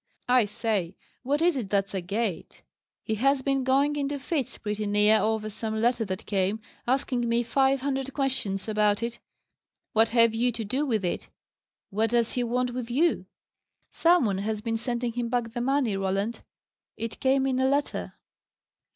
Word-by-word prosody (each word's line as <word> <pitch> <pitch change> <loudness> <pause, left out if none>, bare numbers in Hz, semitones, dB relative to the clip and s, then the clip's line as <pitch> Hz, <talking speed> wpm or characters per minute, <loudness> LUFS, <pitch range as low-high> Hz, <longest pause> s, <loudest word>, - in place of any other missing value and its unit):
"I 250 -2 +5
say, 205 -4 -2 0.3
what 285 +5 0
is 350 -2 +3
it 235 -7 -3
that's 195 -1 0
agate? 195 +1 -3 0.4
He 220 - -2
has 275 0 +3
been 275 -1 +1
going 275 +3 +2
into 285 0 -1
fits, 280 -1 -3
pretty 210 0 -3
near, 210 +1 +4
over 220 0 0
some 220 +1 -4
letter 235 +1 +2
that 190 +1 -5
came, 200 +1 0 0.3
asking 250 -2 0
me 235 +1 +2
five 270 +2 +2
hundred 270 -1 -2
questions 255 -9 -1
about 210 0 +2
it. 235 0 -4 0.7
What 225 +1 +5
have 230 -1 +4
you 240 +2 +2
to 225 0 -4
do 270 +8 -1
with 220 -7 0
it? 175 - -3 0.6
What 220 +3 +1
does 235 0 +2
he 250 - -1
want 250 +1 0
with 245 -1 -5
you?" 310 +8 +1 0.6
"Some 345 -4 +4
one 195 -3 0
has 215 +1 -2
been 225 +1 -2
sending 240 +1 -2
him 240 0 -2
back 240 -2 -1
the 240 - -2
money, 260 -4 +1
Roland. 195 +4 -1 0.6
It 230 -1 -5
came 265 0 +2
in 260 -1 0
a 260 0 +3
letter." 285 +1 -1
235 Hz, 175 wpm, -27 LUFS, 215-265 Hz, 0.7 s, I